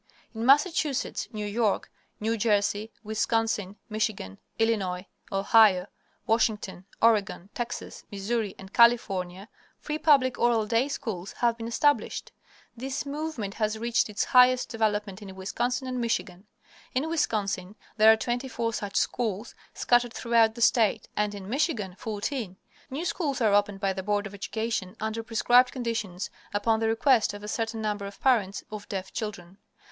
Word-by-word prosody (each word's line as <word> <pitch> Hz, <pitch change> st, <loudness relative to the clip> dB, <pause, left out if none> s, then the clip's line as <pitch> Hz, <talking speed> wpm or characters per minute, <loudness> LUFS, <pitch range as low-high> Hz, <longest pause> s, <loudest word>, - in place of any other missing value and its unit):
In 225 Hz, +1 st, -3 dB
Massachusetts, 295 Hz, 0 st, +2 dB
New 210 Hz, -2 st, -4 dB
York, 210 Hz, 0 st, 0 dB, 0.3 s
New 225 Hz, +2 st, 0 dB
Jersey, 210 Hz, 0 st, +1 dB
Wisconsin, 220 Hz, -2 st, 0 dB
Michigan, 215 Hz, -, -3 dB, 0.2 s
Illinois, 200 Hz, -5 st, 0 dB, 0.3 s
Ohio, 195 Hz, -1 st, +5 dB, 0.4 s
Washington, 215 Hz, -5 st, 0 dB, 0.2 s
Oregon, 205 Hz, -4 st, +2 dB
Texas, 240 Hz, -1 st, -5 dB
Missouri, 205 Hz, +1 st, -2 dB
and 190 Hz, +1 st, -12 dB
California, 195 Hz, -6 st, +3 dB, 0.3 s
free 300 Hz, 0 st, -4 dB
public 270 Hz, -5 st, +4 dB
oral 235 Hz, -2 st, +3 dB
day 230 Hz, +5 st, +2 dB
schools 210 Hz, -9 st, -5 dB
have 235 Hz, -1 st, +1 dB
been 230 Hz, 0 st, -6 dB
established. 290 Hz, +5 st, +1 dB, 0.4 s
This 265 Hz, +4 st, -4 dB
movement 285 Hz, -8 st, -4 dB
has 215 Hz, 0 st, -1 dB
reached 235 Hz, 0 st, +1 dB
its 210 Hz, -, -1 dB
highest 250 Hz, 0 st, +5 dB
development 210 Hz, -4 st, -1 dB
in 195 Hz, -2 st, -9 dB
Wisconsin 245 Hz, +7 st, -2 dB
and 255 Hz, -1 st, -2 dB
Michigan. 205 Hz, -4 st, -2 dB, 0.5 s
In 270 Hz, +5 st, +1 dB
Wisconsin 205 Hz, -, -1 dB, 0.2 s
there 220 Hz, 0 st, +8 dB
are 220 Hz, -, +4 dB
twenty 245 Hz, +3 st, -2 dB
four 230 Hz, -3 st, -2 dB
such 205 Hz, -2 st, -4 dB
schools 220 Hz, -2 st, -1 dB, 0.2 s
scattered 240 Hz, -1 st, +2 dB
throughout 230 Hz, -1 st, +3 dB
the 235 Hz, -, 0 dB
state, 225 Hz, -2 st, +3 dB
and 210 Hz, 0 st, 0 dB
in 195 Hz, -2 st, -8 dB
Michigan 235 Hz, -, -1 dB
fourteen. 215 Hz, -1 st, -4 dB, 0.3 s
New 290 Hz, +6 st, -4 dB
schools 310 Hz, -6 st, -1 dB
are 220 Hz, -4 st, +3 dB
opened 205 Hz, -1 st, +2 dB
by 195 Hz, -1 st, 0 dB
the 190 Hz, -, -4 dB
Board 205 Hz, +1 st, 0 dB
of 210 Hz, -, -8 dB
Education 205 Hz, -1 st, -3 dB
under 220 Hz, +1 st, -2 dB
prescribed 240 Hz, +3 st, +4 dB
conditions 230 Hz, -7 st, -3 dB, 0.2 s
upon 220 Hz, +2 st, +2 dB
the 225 Hz, -, +1 dB
request 225 Hz, -1 st, +3 dB
of 205 Hz, -, -10 dB
a -, -, -6 dB
certain 225 Hz, 0 st, -2 dB
number 205 Hz, -2 st, -2 dB
of 200 Hz, -, -11 dB
parents 215 Hz, -7 st, +2 dB
of 215 Hz, -1 st, -8 dB
deaf 190 Hz, -1 st, -5 dB
children. 195 Hz, -4 st, -6 dB
220 Hz, 150 wpm, -27 LUFS, 200-240 Hz, 0.5 s, there